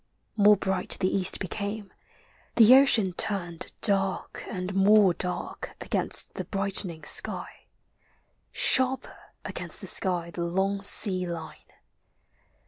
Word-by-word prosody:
More 210 -1 +4
bright 190 -1 -2
the 185 -1 -1
East 190 -1 +2
became, 200 +2 -6 0.6
the 230 +1 +6
ocean 230 -9 +4
turned 175 -3 -2
Dark 195 -2 -1
and 185 +1 -5
more 195 -1 +4
dark 180 0 -6
against - - 0
the - - -7
brightening 195 -5 -1
«ky, - - +1 0.6
— - - -42
Sharper 260 0 0 0.2
against - - -7
the - - -9
sky 175 -3 -1
the 175 - -7
long 190 +3 -2
sea 190 -2 +3
line. 165 -2 -7
195 Hz, 120 wpm, -25 LUFS, 180-205 Hz, 0.6 s, the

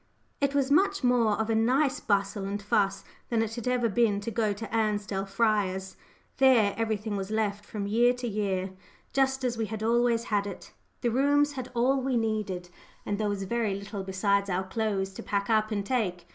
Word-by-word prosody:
It 280 0 0
was 280 -1 +1
much 395 +3 +3
more 245 -3 +3
of 220 - 0
a - - +2
nice 260 +5 +2
bustle 200 0 0
and 200 +1 -3
fuss 200 -1 0 0.3
than 230 -2 +2
it 225 0 -4
had 235 0 -5
ever 250 -2 +2
been 215 -1 +2
to 230 - -4
go 215 -1 +1
to 220 +3 -5
Ansdell 205 -3 -1
Friars. 195 -3 0 0.4
There, 240 -7 +5
everything 220 -2 -2
was 195 0 -3
left 210 -2 -1
from 210 -1 -5
year 235 +4 +4
to 250 -1 -5
year 195 -3 -1 0.4
just 265 -1 +1
as 240 -2 -1
we 220 - 0
had 220 +1 -5
always 235 0 +2
had 205 -3 0
it. 200 - -9 0.3
The 240 - +1
rooms 285 +4 +3
had 255 -3 -6
all 260 +3 +2
we 260 -1 0
needed, 210 -6 -2 0.4
and 205 0 -2
there 210 -1 0
was 200 -1 -2
very 220 -1 -1
little 200 +1 -6
besides 200 +1 0
our 185 +1 0
clothes 195 -1 -2
to - - -7
pack 200 -1 -1
up 215 -1 +3
and 205 -2 -2
take. 195 -8 -1
215 Hz, 200 wpm, -28 LUFS, 200-240 Hz, 0.4 s, There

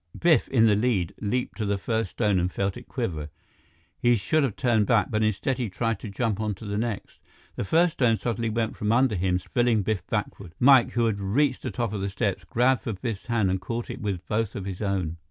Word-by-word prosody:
Biff, 165 -7 +4
in 115 -4 +4
the 105 -2 +5
lead, 105 -6 0
leaped 125 +5 -2
to 110 - 0
the 100 0 +1
first 110 +3 -1
stone 105 -5 +1
and 90 +1 0
felt 100 0 -1
it 120 - -11
quiver. 80 - -3 0.7
He 120 0 +4
should 115 +10 +1
have 130 -8 0
turned 115 -6 +2
back, 115 -4 +2
but 110 -1 +1
instead, 110 +5 0
he 120 -4 -1
tried 115 +2 -1
to 110 - -7
jump 105 0 -1
on 105 -2 -1
to 110 - -11
the 100 0 -2
next. 115 -3 -4 0.4
The - - -2
first 165 - +3
stone 115 -4 +2
suddenly 115 0 -2
went 110 0 -1
from 105 +1 -1
under 125 0 +3
him, 90 -1 +1
spilling 115 +2 +1
Biff 110 -1 -1
backward. 90 -4 -4
Mike, 130 -1 +6
who 120 0 +2
had 110 -3 0
reached 125 +8 +1
the 130 - -3
top 115 0 -2
of 100 - -3
the 100 - -1
steps, 95 -2 -2
grabbed 125 +6 +2
for 115 - -3
Biff's 105 +2 -5
hand 110 -5 +1
and 95 0 -1
caught 115 +5 -4
it - - -8
with 100 -5 -3
both 110 -1 -1
of 95 - -5
his 95 0 -5
own. 95 -5 -1
110 Hz, 235 wpm, -26 LUFS, 100-120 Hz, 0.7 s, Mike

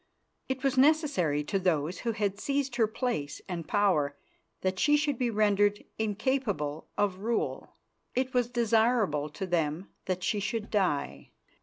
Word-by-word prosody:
It 265 0 -2
was 270 -1 +2
necessary 275 - +3
to 195 +6 -1
those 170 -2 0
who 230 -1 -1
had 200 -2 -1
seized 275 -1 -1
her 225 -3 +4
place 220 - -3
and 170 -3 -5
power 160 -9 +2 0.4
that 185 0 -1
she 295 0 +4
should 290 -4 0
be 245 -2 +1
rendered 205 -1 +2
incapable 210 - -1
of 200 -2 +1
rule. 230 +3 -2 0.4
It 255 0 0
was 245 -1 +2
desirable 225 -9 +2
to 190 +6 -5
them 170 0 -1 0.2
that 185 -1 -2
she 210 - +1
should 210 +2 -3
die. 145 - 0
205 Hz, 150 wpm, -29 LUFS, 180-245 Hz, 0.4 s, her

